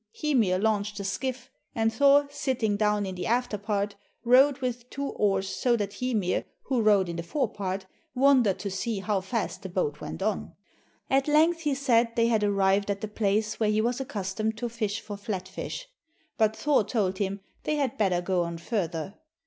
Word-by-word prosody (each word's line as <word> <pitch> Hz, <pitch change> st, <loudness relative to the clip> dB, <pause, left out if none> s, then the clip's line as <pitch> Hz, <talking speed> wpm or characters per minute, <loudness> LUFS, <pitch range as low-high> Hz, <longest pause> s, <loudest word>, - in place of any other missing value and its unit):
Hymir 235 Hz, -12 st, +2 dB
launched 210 Hz, 0 st, 0 dB
the 200 Hz, -, -4 dB
skiff, 250 Hz, +5 st, -3 dB, 0.2 s
and 225 Hz, -1 st, +1 dB
Thor, 285 Hz, +3 st, +5 dB
sitting 260 Hz, -7 st, 0 dB
down 210 Hz, 0 st, +1 dB
in 190 Hz, -, -4 dB
the 180 Hz, -, -4 dB
after 245 Hz, -1 st, +1 dB
part, 205 Hz, -1 st, -1 dB, 0.3 s
rowed 260 Hz, +3 st, +5 dB
with 250 Hz, -2 st, -4 dB
two 280 Hz, +1 st, -3 dB
oars 195 Hz, -2 st, +1 dB
so 235 Hz, +6 st, +1 dB
that 200 Hz, -2 st, -3 dB
Hymir, 220 Hz, -8 st, 0 dB, 0.2 s
who 255 Hz, -4 st, 0 dB
rowed 205 Hz, -4 st, +4 dB
in 170 Hz, 0 st, -4 dB
the -, -, -2 dB
fore 240 Hz, -, -2 dB
part, 190 Hz, -1 st, -3 dB, 0.3 s
wondered 255 Hz, -6 st, +4 dB
to 200 Hz, -, -4 dB
see 215 Hz, +3 st, -2 dB
how 200 Hz, -1 st, 0 dB
fast 205 Hz, -1 st, -3 dB
the 190 Hz, -, -6 dB
boat 150 Hz, -5 st, -2 dB
went -, -, -5 dB
on. 215 Hz, -1 st, -2 dB, 0.6 s
At 270 Hz, +1 st, +3 dB
length 320 Hz, +3 st, +4 dB
he 295 Hz, -4 st, 0 dB
said 240 Hz, -4 st, +2 dB
they 230 Hz, -1 st, +3 dB
had 220 Hz, -2 st, +2 dB
arrived 200 Hz, 0 st, +2 dB
at 200 Hz, -1 st, -1 dB
the 215 Hz, -, -3 dB
place 210 Hz, +1 st, 0 dB
where 215 Hz, -2 st, +2 dB
he 215 Hz, 0 st, +2 dB
was 240 Hz, +4 st, 0 dB
accustomed 215 Hz, -1 st, -3 dB
to 240 Hz, +1 st, -3 dB
fish 220 Hz, -2 st, -2 dB
for 210 Hz, -1 st, -7 dB
flat 200 Hz, -2 st, -4 dB
fish, -, -, -6 dB, 0.5 s
but 220 Hz, -1 st, +2 dB
Thor 290 Hz, -4 st, +2 dB
told 195 Hz, -3 st, -1 dB
him 200 Hz, 0 st, -2 dB, 0.2 s
they 305 Hz, -, -1 dB
had 275 Hz, -7 st, -1 dB
better 185 Hz, -4 st, +2 dB
go 185 Hz, 0 st, +1 dB
on 170 Hz, -1 st, -3 dB
further. 175 Hz, -, -3 dB
215 Hz, 195 wpm, -27 LUFS, 195-250 Hz, 0.6 s, Thor